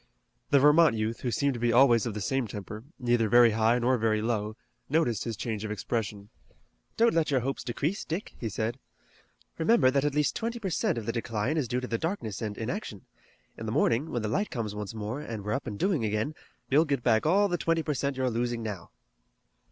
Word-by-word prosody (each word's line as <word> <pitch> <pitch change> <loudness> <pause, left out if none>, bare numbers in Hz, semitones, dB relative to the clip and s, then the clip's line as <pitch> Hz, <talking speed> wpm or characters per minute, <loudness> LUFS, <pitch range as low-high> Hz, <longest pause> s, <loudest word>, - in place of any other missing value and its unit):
The 140 - +5
Vermont 150 -1 +6
youth, 110 +1 -2
who 125 - -1
seemed 140 +2 +1
to 120 - -5
be 120 0 +2
always 120 -2 +5
of 110 - -4
the 105 - -4
same 135 +4 0
temper, 105 +1 -7
neither 120 -3 +1
very 120 +1 +7
high 115 +2 +3
nor 125 +1 +2
very 110 -1 +2
low, 110 -1 -2 0.3
noticed 140 -8 +1
his 115 -4 -4
change 110 -2 -3
of 110 - -4
expression. 105 -1 -3 0.7
"Don't 230 0 +4
let 165 -2 +2
your 135 -3 +2
hopes 135 +3 -3
decrease, 145 - -2
Dick," 170 +6 -5
he 115 - -3
said. 110 +5 -3 0.8
"Remember 160 - +4
that 140 0 +1
at 145 -1 0
least 150 -1 +1
twenty 230 +1 -2
per 200 -5 -4
cent 200 - 0
of 115 - -4
the 115 - -1
decline 115 +3 -2
is 150 -6 0
due 125 +2 -1
to 125 - -4
the 115 - -2
darkness 160 - -3
and 105 -2 -4
inaction. 115 - -5 0.5
In 110 - -5
the - - -2
morning, 135 +2 +1
when 120 - -2
the - - -1
light 205 - 0
comes 110 -4 -3
once 105 +1 -6
more, 110 +6 -4
and 110 -7 -6
we're 105 - -1
up 135 - -3
and 105 -3 -4
doing 180 - +1
again, 110 +7 -1 0.3
you'll 145 +4 +4
get 140 -6 -1
back 110 +2 +3
all 200 +5 +4
the 175 -3 -2
twenty 165 -1 +1
per 150 - -1
cent 140 0 -2
you're 130 -1 0
losing 120 0 -2
now." 100 -6 -6
120 Hz, 225 wpm, -28 LUFS, 110-145 Hz, 0.8 s, very